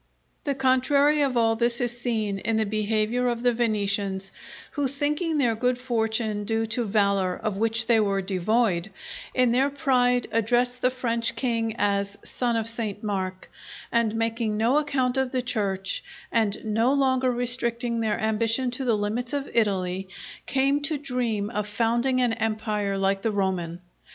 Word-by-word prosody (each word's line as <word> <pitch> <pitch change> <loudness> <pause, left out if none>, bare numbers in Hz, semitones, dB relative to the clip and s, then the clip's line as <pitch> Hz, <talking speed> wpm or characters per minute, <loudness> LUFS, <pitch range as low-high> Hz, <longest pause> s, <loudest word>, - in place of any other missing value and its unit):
_" - - -44
The 280 -2 0
contrary 280 +3 +3
of 270 -3 +1
all 225 -1 +3
this 235 +1 0
is 240 -1 -1
seen 220 -5 -1
in 220 +2 0
the 220 - +2
behaviour 215 +3 0
of 240 -1 -1
the 245 -1 +3
Venetians, 200 -4 0 0.4
who 285 -2 0
thinking 295 +4 -1
their 245 -5 +3
good 250 +3 0
fortune 225 -3 -1
due 225 +1 0
to 240 0 0
valour 200 -3 +2
of 215 -3 -3
which 225 +1 +1
they 230 -1 +4
were 200 -2 +1
devoid, 195 0 +1 0.5
in 250 -2 +4
their 265 +4 +3
pride 250 -4 +2
addressed 245 +3 +1
the 255 - +4
French 235 -2 -1
king 230 -3 -1
as 200 0 0
"Son 240 -2 -1
of 225 -1 -1
St. 225 -3 -4
Mark;" 190 -3 -3 0.4
and 230 -2 +1
making 225 -1 -1
no 240 +7 +3
account 265 -4 0
of 265 -1 0
the 255 -2 -1
Church, 200 -6 -2 0.3
and 220 -2 0
no 225 +4 +2
longer 260 -2 +2
restricting 240 -1 -1
their 220 -2 0
ambition 225 +3 0
to 255 +2 -4
the 230 -3 +2
limits 225 +5 -2
of 280 -1 -3
Italy, 190 -4 0 0.4
came 275 +2 +2
to 290 +1 -1
dream 240 -6 -2
of 210 -3 -2
founding 235 +4 +1
an 245 -2 +2
empire 215 -3 -1
like 195 0 +1
the 225 - 0
Roman. 185 -4 -1
230 Hz, 165 wpm, -25 LUFS, 210-250 Hz, 0.5 s, they